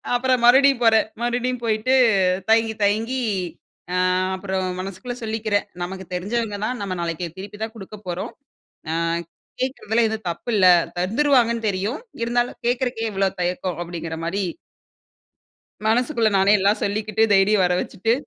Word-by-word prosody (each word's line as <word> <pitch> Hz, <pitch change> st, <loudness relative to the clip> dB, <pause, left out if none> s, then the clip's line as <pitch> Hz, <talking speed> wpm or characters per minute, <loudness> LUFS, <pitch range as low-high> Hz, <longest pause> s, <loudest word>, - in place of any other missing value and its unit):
அப்புறம் 250 Hz, 0 st, +1 dB
மறுபடியும் 265 Hz, +1 st, +6 dB
போறேன். 225 Hz, -2 st, +4 dB, 0.2 s
மறுபடியும் 245 Hz, +1 st, -1 dB
போயிட்டு 220 Hz, +3 st, +1 dB, 0.6 s
தயங்கி 225 Hz, 0 st, +3 dB
தயங்கி, 225 Hz, +6 st, +1 dB, 0.7 s
அ -, -, 0 dB, 0.4 s
அப்புறம் 190 Hz, -1 st, -2 dB, 0.2 s
மனசுக்குள்ள 195 Hz, +6 st, -6 dB
சொல்லிக்கிறேன். 215 Hz, -2 st, -1 dB, 0.2 s
நமக்கு 190 Hz, +1 st, -6 dB
தெரிஞ்சவங்க 205 Hz, +3 st, -2 dB
தான், 250 Hz, +1 st, -3 dB
நம்ம 190 Hz, -2 st, -3 dB
நாளைக்கு 170 Hz, +1 st, -3 dB
திருப்பி 205 Hz, +2 st, -9 dB
தான் 220 Hz, 0 st, -5 dB
குடுக்கப் 205 Hz, 0 st, -11 dB
போறோம். 175 Hz, 0 st, -4 dB, 0.6 s
அ -, -, -1 dB, 0.7 s
கேக்கிறதுல 235 Hz, -3 st, 0 dB
எதுவும் 220 Hz, -3 st, -5 dB
தப்பு 240 Hz, -, -8 dB
இல்ல. 195 Hz, -, +4 dB, 0.3 s
தந்துருவாங்கன்னு 235 Hz, +2 st, +2 dB
தெரியும். 200 Hz, +8 st, -2 dB, 0.2 s
இருந்தாலும் 240 Hz, +1 st, -1 dB
கேட்குறதுக்கே 245 Hz, -2 st, -1 dB
இவ்ளோ 195 Hz, 0 st, +2 dB
தயக்கம் 180 Hz, -1 st, -2 dB
அப்டிங்கிற 165 Hz, -1 st, -6 dB
மாரி 180 Hz, +4 st, -2 dB, 1.5 s
மனசுக்குள்ள 235 Hz, +1 st, +2 dB
நானே 195 Hz, +2 st, +4 dB
எல்லாம் 200 Hz, +2 st, +2 dB
சொல்லிக்கிட்டு 215 Hz, +2 st, 0 dB
தைரியம் 195 Hz, 0 st, +4 dB
வரவச்சுட்டு, 180 Hz, +4 st, 0 dB
215 Hz, 130 wpm, -22 LUFS, 190-240 Hz, 1.5 s, மறுபடியும்